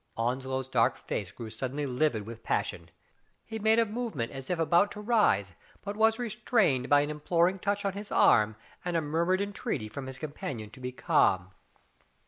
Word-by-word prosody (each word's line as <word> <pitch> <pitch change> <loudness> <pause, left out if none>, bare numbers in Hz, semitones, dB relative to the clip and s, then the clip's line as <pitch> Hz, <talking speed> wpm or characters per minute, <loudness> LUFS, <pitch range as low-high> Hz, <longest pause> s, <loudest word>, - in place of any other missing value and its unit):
Onslow's 130 +2 -1
dark 120 -4 +2
face 100 -4 -4
grew 115 -2 -8
suddenly 135 +5 -3
livid 125 -5 0
with 115 +1 -9
passion. - - -2 0.6
He 220 0 -5
made 220 +1 +4
a 230 - +5
movement 220 - -3
as 135 -1 -8
if 180 - 0
about 170 +5 +3
to - - -8
rise, 210 - +2 0.3
but 200 0 -4
was 220 +1 +4
restrained 215 - +1
by 145 0 +6
an 145 +1 -2
imploring 170 +5 +1
touch 200 +2 -1
on 195 - 0
his 205 +1 -7
arm, 110 0 +5 0.3
and 175 -1 0
a - - +1
murmured 170 +5 +1
entreaty 200 - -3
from 130 +5 -7
his 130 0 -7
com 155 0 -5
panion 110 -8 -6
to 130 - -14
be 125 0 -4
calm. 95 - +2
150 Hz, 185 wpm, -29 LUFS, 125-200 Hz, 0.6 s, by